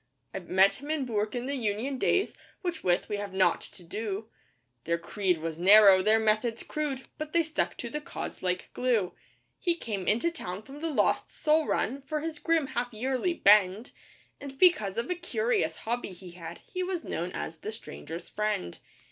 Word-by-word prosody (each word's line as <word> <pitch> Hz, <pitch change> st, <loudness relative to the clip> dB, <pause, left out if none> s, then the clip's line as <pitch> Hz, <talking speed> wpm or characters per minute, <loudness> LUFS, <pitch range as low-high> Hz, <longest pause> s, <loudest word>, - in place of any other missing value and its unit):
I -, -, -3 dB
met 190 Hz, +5 st, +3 dB
him 290 Hz, -, -8 dB
in 310 Hz, -4 st, 0 dB
Bourke 215 Hz, -1 st, -1 dB
in 245 Hz, 0 st, -2 dB
the 275 Hz, -, -2 dB
Union 245 Hz, +2 st, -2 dB
days 385 Hz, +8 st, +2 dB, 0.3 s
with 350 Hz, -3 st, -3 dB
which 175 Hz, -1 st, +2 dB
we 205 Hz, -, -2 dB
have 200 Hz, -2 st, -5 dB
nought 190 Hz, -1 st, +3 dB
to 180 Hz, -, -11 dB
do 210 Hz, +4 st, -4 dB, 0.6 s
(Their 170 Hz, +1 st, +1 dB
creed 185 Hz, +1 st, 0 dB
was 160 Hz, 0 st, -5 dB
narrow, 195 Hz, +1 st, +8 dB
their 215 Hz, +3 st, +4 dB
methods 220 Hz, +1 st, +1 dB
crude, 290 Hz, -4 st, -3 dB, 0.2 s
but 310 Hz, 0 st, -5 dB
they 340 Hz, -1 st, +4 dB
stuck 315 Hz, 0 st, -2 dB
to 235 Hz, -, -5 dB
'the 300 Hz, -, -3 dB
cause' -, -, -6 dB
like 180 Hz, 0 st, -2 dB
glue). 235 Hz, -8 st, +1 dB, 0.5 s
He 345 Hz, -2 st, +1 dB
came 205 Hz, -, -4 dB
into 240 Hz, +11 st, +2 dB
town 200 Hz, -, -6 dB
from 275 Hz, +5 st, -11 dB
the 330 Hz, -, -1 dB
Lost 300 Hz, -, +1 dB
Soul 310 Hz, 0 st, +2 dB
Run 275 Hz, +2 st, 0 dB
for 300 Hz, +2 st, -3 dB
his 315 Hz, -1 st, -4 dB
grim 330 Hz, -3 st, +2 dB
half 245 Hz, +1 st, -1 dB
yearly 260 Hz, +9 st, -1 dB
'bend,' 205 Hz, -, +4 dB, 0.5 s
And 275 Hz, -1 st, -8 dB
because 220 Hz, -, +4 dB
of 235 Hz, +2 st, -1 dB
a -, -, +4 dB
curious 445 Hz, +6 st, 0 dB
hobby 235 Hz, -3 st, -3 dB
he 180 Hz, 0 st, -11 dB
had, 170 Hz, -1 st, -9 dB
he 365 Hz, -, -4 dB
was 365 Hz, -2 st, -2 dB
known 175 Hz, +2 st, -3 dB
as 160 Hz, 0 st, -5 dB
'The 215 Hz, -, -5 dB
Stranger's 170 Hz, -6 st, -8 dB
Friend. 210 Hz, -, -2 dB
225 Hz, 190 wpm, -29 LUFS, 190-300 Hz, 0.6 s, narrow